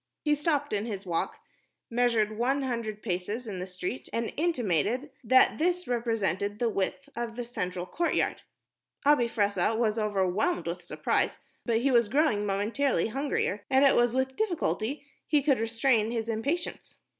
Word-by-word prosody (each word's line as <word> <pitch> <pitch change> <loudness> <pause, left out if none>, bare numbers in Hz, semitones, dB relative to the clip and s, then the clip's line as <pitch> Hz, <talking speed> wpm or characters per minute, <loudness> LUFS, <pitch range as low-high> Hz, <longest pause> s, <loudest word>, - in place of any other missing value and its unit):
He 300 - +3
stopped 295 -2 0
in 210 +2 -1
his 200 -3 -5
walk, 170 -2 -2 0.5
measured 230 -3 +1
one 265 +5 +1
hundred 230 -4 -3
paces 205 +5 -3
in 195 -4 -5
the 180 - -4
street, 185 +6 -5
and 230 0 -2
intimated 255 - 0
that 260 +5 +5
this 360 +2 +1
represented 220 -4 -1
the 235 +1 +1
width 210 +7 -2
of 235 -1 -4
the 245 0 -4
central 180 -6 -4
courtyard. 340 - 0 0.6
Abi 285 -5 +5
Fressah 205 0 +1
was 225 -1 +1
overwhelmed 205 - 0
with - - -4
surprise, - - 0 0.3
but 230 -1 +2
he 275 +2 +2
was 235 -4 +4
growing 230 -6 +2
momentarily 220 +7 +1
hungrier, 245 -6 -1
and 265 +1 +5
it 275 - +5
was 240 0 +3
with 260 0 0
difficulty 285 - -1 0.2
he 295 -3 +3
could 275 -4 +3
restrain 225 0 +2
his 230 -1 -2
impatience. 280 +10 -3
230 Hz, 155 wpm, -28 LUFS, 210-270 Hz, 0.6 s, that